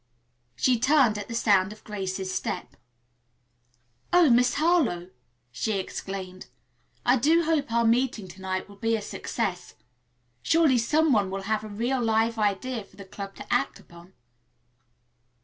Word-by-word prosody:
She 245 - +2
turned 260 -5 +3
at 205 - -7
the 230 - -6
sound 200 -4 +3
of 215 - -13
Grace's 190 -2 -4
step. 130 - -4 1.4
"Oh, 350 -6 +5
Miss 245 +1 +4
Harlowe!" 285 - +1 0.4
she 215 - -2
exclaimed. 185 -1 -6 0.6
"I 245 +2 +4
do 320 +7 +3
hope 310 -6 0
our 235 0 +2
meeting 230 -3 +1
to 190 - -13
night 185 0 -3
will 200 -1 -15
be 225 +2 0
a 220 - -3
success. 200 -4 -4 0.7
Surely 305 - +3
some 305 +5 +2
one 205 -4 +2
will 195 0 -4
have 215 +1 -1
a - - -6
real 240 +5 -1
live 225 0 +1
idea 215 +3 -1
for 195 - -22
the 195 0 -11
club 195 +1 -8
to - - -5
act - - 0
upon." 170 +2 -16
220 Hz, 150 wpm, -26 LUFS, 195-250 Hz, 1.4 s, Oh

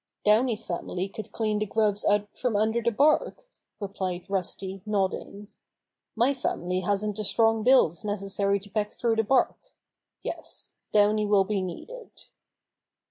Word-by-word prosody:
"Downy's 220 +1 +3
family 180 +1 -3
could 205 +1 -8
clean 215 -2 -1
the 215 - -1
grubs 210 0 +1
out 205 0 +1
from 245 -4 -1
under 220 +3 +2
the 235 - +1
bark," 300 - +2 0.3
replied 190 -3 -4
Rusty 190 0 -3
nodding. 200 0 -2 0.7
"My 240 +5 +3
family 185 -8 -2
hasn't 205 +2 -1
the 215 - -2
strong 225 +1 +3
bills 230 -8 +4
necessary 200 -1 0
to 205 - -11
peck 210 -1 -1
through 230 -2 0
the 225 - +3
bark. 250 +4 0 0.5
Yes, - - -6 0.2
Downy 210 0 +3
will 205 -1 +4
be 195 0 -1
needed." 455 - -7
210 Hz, 140 wpm, -27 LUFS, 195-225 Hz, 0.7 s, bills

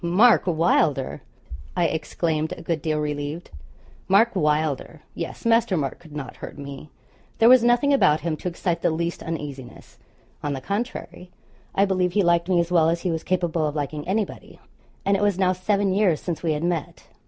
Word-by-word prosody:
'Pooh! - - -1
Mark 210 +5 +5
Wylder,' 160 -5 +1 0.6
I 175 - +3
exclaimed, 160 0 -1
a - - -10
good 165 -2 -2
deal 155 0 -1
relieved. 150 +2 -4 0.6
Mark 210 +4 +4
Wylder! 150 -2 -1
Yes, 170 - -6
Master 230 -5 +3
Mark 140 -4 -3
could 155 -3 -14
not 135 -4 -6
hurt - - -9
me. 140 +1 -8 0.5
There 225 - +5
was 250 -1 +7
nothing 240 +4 +3
about 155 - +4
him 165 -2 -1
to - - -5
excite 170 -1 -2
the - - +2
least 170 +1 -2
uneasiness; 145 -6 -7 0.4
on 145 -1 -2
the 135 - -4
contrary, 200 - -5 0.5
I 200 - +4
believe 185 -2 0
he 205 - +3
liked 170 0 +2
me 180 -2 +3
as 170 0 -1
well 165 -2 +4
as 170 0 -1
he 180 - -1
was 160 0 -3
capable 170 -3 0
of 150 - -4
liking 150 +1 -4
anybody, 205 +2 -3 0.5
and 200 - +3
it 195 - -1
was 205 -3 +2
now 185 -1 +2
seven 195 +1 0
years 190 -6 +2
since 170 -3 -4
we 165 -2 0
had 150 +1 -3
met. 170 -3 -2
170 Hz, 190 wpm, -24 LUFS, 150-190 Hz, 0.6 s, was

